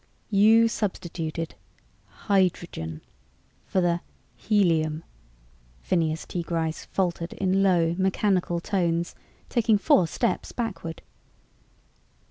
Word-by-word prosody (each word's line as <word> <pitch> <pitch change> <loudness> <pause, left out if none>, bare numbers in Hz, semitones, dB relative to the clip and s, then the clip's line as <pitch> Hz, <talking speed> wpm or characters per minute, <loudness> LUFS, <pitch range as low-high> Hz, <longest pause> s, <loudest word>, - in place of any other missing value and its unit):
"You 220 +3 +6
substituted... 170 -7 -3 0.7
hydrogen... 175 - 0 0.7
for 185 - +1
the... 175 -1 +1 0.3
helium?" 165 -7 +1 0.8
Phineas 160 -3 0
T. 175 - -3
Gryce 165 -1 -2
faltered 170 -3 -2
in 190 0 +1
low 175 -4 +3
mechanical 190 -2 +1
tones, 170 -2 -1 0.3
taking 225 -3 +3
four 185 -2 +4
steps 235 +7 -1
backward. 200 -9 -4
175 Hz, 90 wpm, -26 LUFS, 165-195 Hz, 0.8 s, You